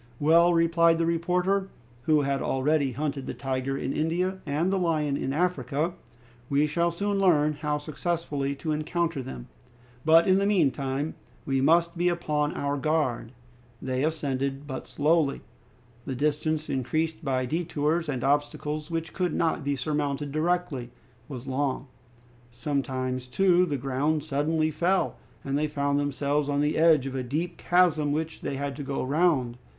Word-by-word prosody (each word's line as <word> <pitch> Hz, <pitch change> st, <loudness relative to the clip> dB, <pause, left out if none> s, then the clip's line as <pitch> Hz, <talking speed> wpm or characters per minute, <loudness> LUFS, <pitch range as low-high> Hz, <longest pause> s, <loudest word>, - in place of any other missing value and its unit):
"Well," 170 Hz, +3 st, +5 dB
replied 165 Hz, 0 st, +4 dB
the 165 Hz, -, +1 dB
reporter, 180 Hz, +4 st, +1 dB, 0.4 s
who 155 Hz, -2 st, +4 dB
had 140 Hz, -1 st, -1 dB
already 140 Hz, 0 st, +1 dB
hunted 140 Hz, 0 st, -3 dB
the -, -, -4 dB
tiger 135 Hz, 0 st, -2 dB
in 135 Hz, 0 st, -2 dB
India, 180 Hz, +4 st, -1 dB
and 160 Hz, +7 st, 0 dB
the 195 Hz, -, +1 dB
lion 155 Hz, -5 st, +1 dB
in 135 Hz, -, -2 dB
Africa, 155 Hz, -1 st, 0 dB, 0.6 s
"we 145 Hz, +1 st, +3 dB
shall 170 Hz, +3 st, +1 dB
soon 200 Hz, +4 st, -1 dB
learn 155 Hz, -6 st, +4 dB
how 150 Hz, 0 st, -2 dB
successfully 150 Hz, -2 st, -2 dB
to 155 Hz, +3 st, -4 dB
encounter 160 Hz, 0 st, -1 dB
them. 65 Hz, -, -8 dB, 0.6 s
But 165 Hz, +2 st, +6 dB
in 190 Hz, 0 st, +5 dB
the 200 Hz, -, +1 dB
meantime 140 Hz, -5 st, +1 dB, 0.3 s
we 135 Hz, -1 st, +1 dB
must 170 Hz, +4 st, +3 dB
be 175 Hz, +1 st, +2 dB
upon 150 Hz, -4 st, 0 dB
our 140 Hz, 0 st, -1 dB
guard!" 145 Hz, -6 st, 0 dB, 0.5 s
They 130 Hz, +1 st, -2 dB
ascended 140 Hz, -3 st, -2 dB
but 130 Hz, -2 st, -6 dB
slowly. 150 Hz, -1 st, +1 dB, 0.7 s
The 130 Hz, -, -2 dB
distance, 150 Hz, +3 st, 0 dB
increased 155 Hz, +5 st, -1 dB
by 130 Hz, -2 st, 0 dB
detours 160 Hz, +1 st, -1 dB
and 130 Hz, -4 st, -2 dB
obstacles 150 Hz, +2 st, -1 dB
which 165 Hz, -1 st, -3 dB
could 180 Hz, -3 st, -1 dB
not 160 Hz, -2 st, 0 dB
be 140 Hz, 0 st, 0 dB
surmounted 145 Hz, +1 st, -2 dB
directly, 155 Hz, -5 st, -1 dB, 0.4 s
was 130 Hz, -2 st, -7 dB
long. 135 Hz, 0 st, -1 dB, 0.7 s
Sometimes, 130 Hz, 0 st, -2 dB
too, 180 Hz, +5 st, +3 dB
the 145 Hz, -3 st, -1 dB
ground 140 Hz, +4 st, 0 dB
suddenly 155 Hz, +2 st, 0 dB
fell, 175 Hz, +5 st, +1 dB, 0.3 s
and 135 Hz, 0 st, -2 dB
they 155 Hz, -, +1 dB
found 145 Hz, -1 st, 0 dB
themselves 145 Hz, 0 st, 0 dB
on 145 Hz, 0 st, +1 dB
the 150 Hz, +1 st, +1 dB
edge 160 Hz, -4 st, +5 dB
of 135 Hz, -, -4 dB
a 135 Hz, -, -2 dB
deep 160 Hz, +7 st, -3 dB
chasm 165 Hz, -5 st, +3 dB
which 160 Hz, +2 st, -3 dB
they 140 Hz, -, -3 dB
had 140 Hz, 0 st, -3 dB
to -, -, -5 dB
go 140 Hz, -1 st, -3 dB
round. 135 Hz, -4 st, +1 dB
150 Hz, 155 wpm, -27 LUFS, 140-165 Hz, 0.7 s, But